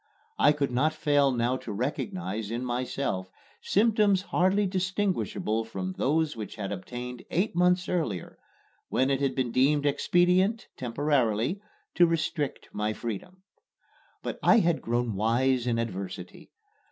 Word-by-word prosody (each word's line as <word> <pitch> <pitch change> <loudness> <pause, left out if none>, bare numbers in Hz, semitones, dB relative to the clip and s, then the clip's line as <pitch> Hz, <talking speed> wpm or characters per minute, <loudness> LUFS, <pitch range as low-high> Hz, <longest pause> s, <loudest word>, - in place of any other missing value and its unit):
I 145 - +6
could 145 -3 -1
not 145 +6 +1
fail 145 -3 +3
now 120 +1 0
to 115 - -7
recognize 105 -4 -3
in 120 +2 -3
myself 120 -6 -2 0.3
symptoms 205 -2 +3
hardly 195 +2 +2
distinguishable 185 - -1
from 95 -4 -5
those 155 +1 +1
which 110 -3 -6
had 100 -2 -4
obtained 120 +5 -6
eight 185 +2 0
months 180 +1 +3
earlier 120 - -2 0.5
when 130 +1 +2
it 135 0 0
had 135 -2 0
been 130 -3 -1
deemed 140 +4 +3
expedient 180 +8 +2
temporarily 130 - 0 0.3
to 175 -1 +5
restrict 160 -3 -2
my 105 +1 -1
freedom. 120 - -6 0.8
But - - -4
I - - +6
had 170 -6 +2
grown 120 -1 -1
wise 120 +4 +1
in 115 -1 +1
adversity. 95 -5 -5
130 Hz, 135 wpm, -28 LUFS, 115-175 Hz, 0.8 s, I